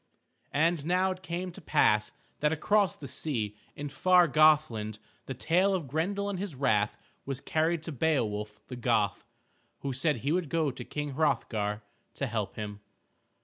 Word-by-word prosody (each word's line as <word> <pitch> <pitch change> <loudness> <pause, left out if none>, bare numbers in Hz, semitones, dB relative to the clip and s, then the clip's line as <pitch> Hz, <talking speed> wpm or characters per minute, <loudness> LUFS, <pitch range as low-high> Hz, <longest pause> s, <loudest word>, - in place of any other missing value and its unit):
And 160 +1 +2
now 185 +2 +3
it 185 0 -6
came 180 0 -4
to 195 - -11
pass 105 -8 +3 0.3
that 150 0 +2
across 200 +5 +2
the 140 - -9
sea 120 -6 -2 0.2
in 145 - -5
far 180 +4 +5
Gothland 150 -9 +3 0.3
the 135 - -4
tale 180 +9 +2
of 165 -7 -3
Grendel 190 +9 -1
and 200 -3 -3
his 195 -6 -4
wrath 110 -6 +1 0.3
was 135 -1 -3
carried 160 +2 0
to 165 - -4
Beowulf 110 -8 -1
the 125 - -6
Goth, 115 -5 0 0.5
who 140 -1 -2
said 135 +2 +1
he 135 +6 -1
would 170 -3 0
go 160 -3 +1
to - - -8
King 145 -1 -4
Hrothgar 110 -8 0 0.3
to 140 - -1
help 110 -5 -3
him. 105 -1 -5
150 Hz, 165 wpm, -29 LUFS, 115-170 Hz, 0.5 s, far